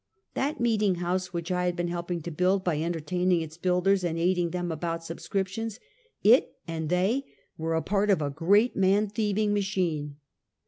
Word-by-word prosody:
That 285 +3 -1
meeting 215 -5 +2
house 180 +1 -2
which 170 +1 -4
I 180 0 +1
had 175 -1 0
been 175 -1 -1
helping 170 -1 -3
to 170 - -5
build 185 +4 +1
by 160 -5 0
entertaining 175 +2 0
its 160 -1 -7
builders 185 +2 +2
and 165 -2 -1
aiding 175 0 +1
them 175 0 -3
about 165 +1 -3
subscriptions, 195 +6 -3 0.4
it 230 +6 +5
and 160 -2 -3
they 190 +10 +1 0.3
were 160 0 -2
a 160 - 0
part 205 +1 +1
of 195 - +4
a 145 -2 -1
great 200 - +3
man 195 +2 +3
thieving 210 0 0
machine. 180 -8 -1
180 Hz, 175 wpm, -27 LUFS, 165-200 Hz, 0.4 s, it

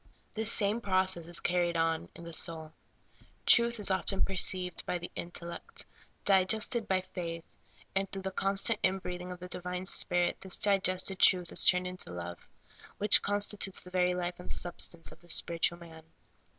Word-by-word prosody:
This 220 0 +1
same 210 +2 +2
process 185 -4 0
is 175 0 +1
carried 175 -1 0
on 165 -1 -1
in 170 - -11
the 170 0 -9
soul. 160 -2 -1 0.7
Truth 235 -1 +5
is 205 -1 +2 0.3
perceived 185 -2 +1
by 180 - -1
the 175 0 -8
intellect, 170 - -6 0.4
digested 210 +4 +2
by 190 -2 +1
the 185 - -23
faith, 165 -2 -5 0.5
and 195 0 0
through 195 -1 -6
the 190 - -3
constant 195 +3 +2
in 190 - +2
breathing 180 -1 -6
of 180 - -8
the 180 - -8
divine 180 0 -5
Spirit 175 -2 0
this 190 -1 0
digested 195 -1 +1
truth 180 -2 +5
is - - +2
turned 180 0 +4
into 180 - -5
love, 85 0 -7 0.6
which 210 0 +7
consti 205 0 0
tutes 195 - 0
the 180 - -9
very 180 -1 +1
life 175 0 -4
and 180 - -11
substance 170 -1 0
of - - -15
the 175 - -21
spiritual 170 +1 +1
man. 165 -2 -13
180 Hz, 175 wpm, -31 LUFS, 175-195 Hz, 0.7 s, which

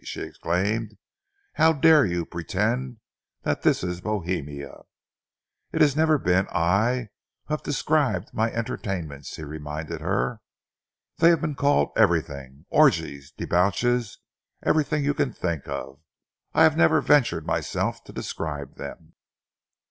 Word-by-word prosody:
she - - -6
exclaimed. 105 +5 -2 0.6
"How 160 +1 +4
dare 155 -1 +6
you 85 -1 -2
pretend 110 +10 -2 0.5
that - - -1
this - - +2
is 90 -1 -3
Bohemia!" 85 -9 -4 0.9
"It - - -1
has 145 -2 +5
never 155 0 +3
been 95 -6 +1
I 105 +7 +1 0.4
who 155 - -4
have 150 - -1
described 140 - 0
my 110 +1 0
entertainments," 85 - -4
he - - -8
reminded 75 +2 -6
her. 100 +6 -1 0.8
"They 165 +1 +7
have 170 -2 +3
been 155 -3 -1
called 140 - +2
everything 70 0 0
orgies, 70 -1 +2
debauches 105 +6 +1 0.5
everything 150 -1 +1
you 145 - +2
can 145 -3 -1
think 85 -5 -3
of. 70 +1 -6 0.5
I - - +4
have - - +5
never 80 - +4
ventured 115 - +3
myself 80 - -2
to - - -11
describe 75 -4 -5
them." - - -9
100 Hz, 130 wpm, -25 LUFS, 80-135 Hz, 0.9 s, They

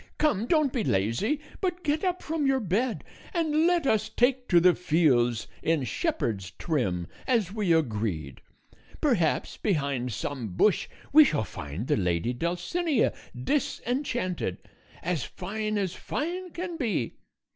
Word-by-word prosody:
Come, 235 -8 +1
don't 305 -4 +3
be 240 - 0
lazy, 115 - +1 0.2
but 360 -2 -2
get 300 +2 0
up 365 -1 0
from 310 -2 0
your 270 -1 +3
bed 225 +4 0 0.3
and 320 -1 +3
let 350 -4 +2
us 220 -3 +2
take 250 +3 +2
to 175 - +6
the 180 +1 +6
fields 135 -10 +2 0.2
in 160 -4 +1
shepherd's 115 - -1
trim 95 - -1 0.2
as 220 -7 +1
we 210 -5 0
agreed. 105 - 0 0.6
Perhaps 205 - +1
behind 140 - 0
some 115 -4 -4
bush 210 - +3 0.3
we 310 +1 +10
shall 155 - +1
find 80 +1 -6
the - - +1
lady 90 +4 0
Dulcinea 180 - 0 0.3
disenchanted, 240 - -1 0.5
as 170 -6 0
fine 215 +3 -3
as 190 -3 -1
fine 355 - -3
can 350 0 -5
be. 215 - -1
195 Hz, 135 wpm, -28 LUFS, -, 0.6 s, we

